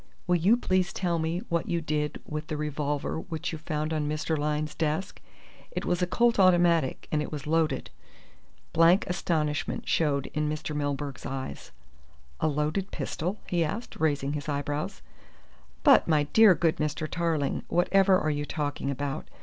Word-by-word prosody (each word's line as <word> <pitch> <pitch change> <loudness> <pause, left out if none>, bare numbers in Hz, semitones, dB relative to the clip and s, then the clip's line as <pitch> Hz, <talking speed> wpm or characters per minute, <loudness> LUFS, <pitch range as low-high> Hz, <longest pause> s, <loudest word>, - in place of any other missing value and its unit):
"Will 180 -1 +3
you 195 +8 +4
please 185 -5 +1
tell 175 -3 -1
me 165 +3 -2
what 170 -1 -1
you 170 - +1
did 150 -2 -2
with 155 +1 -5
the 155 - -3
revolver 150 0 -2
which 170 +1 -4
you 160 - -6
found 155 0 -2
on 150 -2 -1
Mr. 155 +1 -1
Lyne's 150 0 -1
desk? 160 +4 -2 0.5
It - - -4
was 175 +1 0
a 180 - +2
Colt 235 +4 +2
automatic, 175 -6 +3
and 150 - +1
it - - -5
was 150 -1 -5
loaded." 160 0 0 0.8
Blank 165 +4 +5
astonishment 155 -5 -1
showed 145 -4 +1
in 150 0 0
Mr. 150 0 -4
Milburgh's 145 -1 -3
eyes. 130 - -6 0.7
"A - - +1
loaded 155 +6 -1
pistol?" 180 +6 -3
he 175 -2 +1
asked, 205 +10 -4
raising 145 -2 0
his 150 0 -4
eyebrows, 145 - -3 0.8
"but, - - +6
my 155 -2 +3
dear 220 -4 +8
good 165 -1 +1
Mr. 150 0 -2
Tarling, 165 -4 -1
whatever 190 +2 +4
are 155 -2 0
you 145 0 -2
talking 145 -2 -3
about? 140 0 -3
155 Hz, 165 wpm, -28 LUFS, 150-175 Hz, 0.8 s, dear